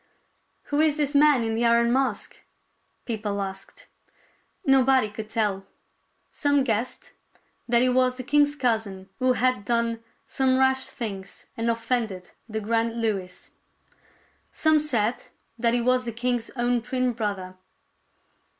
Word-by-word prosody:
" - - -45
Who 290 - 0
is 310 -1 +3
this 290 -1 0
man 290 -3 +5
in 225 0 -1
the 230 +2 0
iron 235 0 +3
mask? 260 -6 -1 0.3
" - - -45
people 210 -3 -3
asked. 195 0 -7 0.8
Nobody 265 -4 +4
could 215 0 -7
tell. 200 -4 -1 0.6
Some 285 -1 +2
guessed 245 +1 -3 0.6
that 240 0 +4
he 255 - +3
was 255 0 +2
the 255 - -5
king's 290 +2 +2
cousin 220 -8 -2
who 255 0 +3
had 255 -4 +1
done 230 0 0 0.2
some 260 -1 +1
rash 265 0 +2
things 195 -4 -7
and 230 +1 -1
offended 230 -5 -2 0.2
the 220 0 -3
grand 230 +2 -1
Louis. 195 -5 -3 1.0
Some 315 -1 +3
said 245 -6 -1 0.3
that 235 +1 +2
he 240 - +1
was 255 +1 +2
the 235 - -3
king's 240 0 -2
own 240 -1 +1
twin 255 +1 -1
brother. 200 -5 -4
235 Hz, 140 wpm, -25 LUFS, 220-255 Hz, 1.0 s, man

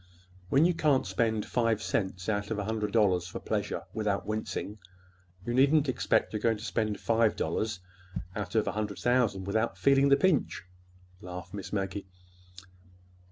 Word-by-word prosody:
When 140 - +5
you 175 - +3
can't 150 -6 +2
spend 110 +3 0
five 115 -3 +1
cents 95 -4 -2
out 100 -1 -1
of 110 - -2
a 105 - -2
hundred 105 0 -2
dollars 95 -6 +2
for - - -6
pleasure - - -2
without 105 -3 -1
wincing, 110 0 -4 0.7
you 120 - -2
needn't 140 +3 +4
expect 100 -6 +1
you're 105 - -1
going 115 0 +1
to 105 - -10
spend 110 -4 -1
five 115 -1 +2
dollars 105 -4 -2 0.5
out 100 -2 -4
of 110 - +2
a - - +1
hundred 105 -1 -3
thousand 120 -6 +1
without 110 +4 0
feeling 140 0 +4
the 140 - +6
pinch," 175 -3 +1 0.6
laughed 90 0 -8
Miss 100 -2 -6
Maggie. 95 -1 -3
110 Hz, 160 wpm, -29 LUFS, 100-120 Hz, 0.7 s, the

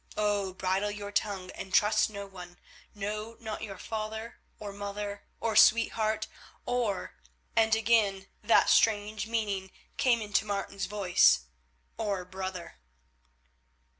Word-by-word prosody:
Oh! 205 -2 0
bridle 190 +2 0
your 205 0 -6
tongue 200 -3 -2
and 190 - -8
trust 210 +3 +4
no 200 -1 -6
one, 180 -2 -11 0.4
no, 210 +2 -4
not 220 -2 -5
your 200 -3 -6
father 220 +2 -5 0.2
or 205 -2 -7
mother, 205 0 -5
or 225 -1 -1
sweetheart, 220 -1 +4 0.4
or—" 235 -6 -1 0.4
and 220 -1 +4
again 210 -3 +2
that 220 +2 +4
strange 215 0 +2
meaning 205 -4 -2 0.3
came 255 -4 +3
into 210 -1 0
Martin's 200 -2 -3
voice, 180 - +4 0.6
"or 200 -5 -2
brother." 185 - -6
205 Hz, 120 wpm, -30 LUFS, 195-220 Hz, 0.6 s, trust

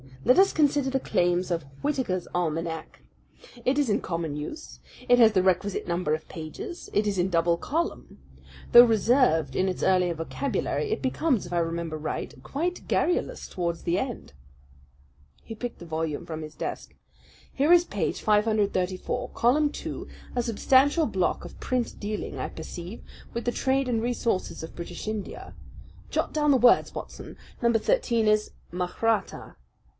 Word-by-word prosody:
Let 250 - +6
us 390 0 +5
consider 290 -3 +2
the 270 0 0
claims 175 -4 +1
of 165 -2 0 0.2
Whitaker's 255 - -1
Almanac. 165 -1 -3 0.6
It 260 +2 +2
is 290 -2 +2
in 205 - +1
common 165 -4 -3
use. 230 - -7 0.3
It 245 0 +5
has 225 -2 +7
the 185 -2 +3
requisite 190 +1 +1
number 170 -3 0
of 155 - -10
pages. 160 - -7
It 210 - +2
is 200 -3 0
in 180 +2 +2
double 170 -1 +2
column. 330 - -3 0.5
Though 240 +1 +10
reserved 220 - +3
in 190 +1 +2
its 185 - -4
earlier 180 -2 +3
vocabulary, 275 - -2
it 440 - -1
becomes, 260 - +1
if 175 - -7
I - - +1
remember 165 -1 -2
right, 155 0 -4
quite 345 +6 -3
garrulous 355 - 0
towards 170 -2 -3
the 175 +2 +1
end." 245 - -5 1.1
He - - -7
picked 245 +2 -5
the 175 - -9
volume 160 -2 -3
from 160 -1 -5
his 155 0 -9
desk. - - -5 0.6
"Here 295 +5 +4
is 350 0 +6
page - - -2
534, 210 -4 +1
column 290 +6 +2
two, - - -6 0.3
a 245 - +2
substantial 270 +7 +3
block 190 -7 -1
of - - -11
print 250 -2 -2
dealing, 210 0 -4
I - - -3
perceive, 175 +5 -8 0.3
with 235 - -4
the 240 - +1
trade 270 +1 +1
and 230 -3 0
resources 235 -7 -1
of 160 - -9
British 170 +4 -7
India. 215 -2 -5 0.5
Jot - - -1
down 295 -1 +2
the 275 - +6
words, 245 0 +5
Watson! - - -8 0.2
Number 235 -1 +3
thirteen 235 - +1
is 215 0 +2 0.2
'Mahratta.' 185 +4 -1
210 Hz, 160 wpm, -27 LUFS, 170-255 Hz, 1.1 s, Though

